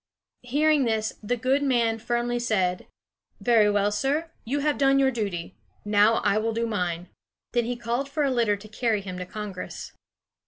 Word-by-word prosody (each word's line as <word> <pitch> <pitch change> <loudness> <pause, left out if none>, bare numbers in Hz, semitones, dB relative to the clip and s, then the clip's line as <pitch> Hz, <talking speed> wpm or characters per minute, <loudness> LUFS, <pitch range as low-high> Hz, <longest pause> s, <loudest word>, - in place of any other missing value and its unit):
Hearing 290 +3 +2
this, 220 -1 0
the 245 +3 -1
good 260 +4 +1
man 235 -5 +1
firmly 240 +1 -1
said: 190 -7 0 0.5
"Very 225 -4 +4
well, 205 0 +2
sir; 285 +10 -1
you 280 +5 -1
have 295 0 0
done 275 -1 +4
your 270 -1 +4
duty; 200 -8 -3 0.3
now 210 +2 +4
I 205 - +3
will 225 +1 -1
do 230 +1 0
mine." 180 -5 -2 0.4
Then 240 -2 +2
he 245 +1 -2
called 240 +3 -2
for 300 +1 -1
a 275 - +2
litter 230 -5 +2
to 210 +2 -12
carry 215 -1 0
him 185 -2 -6
to 180 - -5
Congress. 210 -2 -7
230 Hz, 180 wpm, -26 LUFS, 205-260 Hz, 0.5 s, Very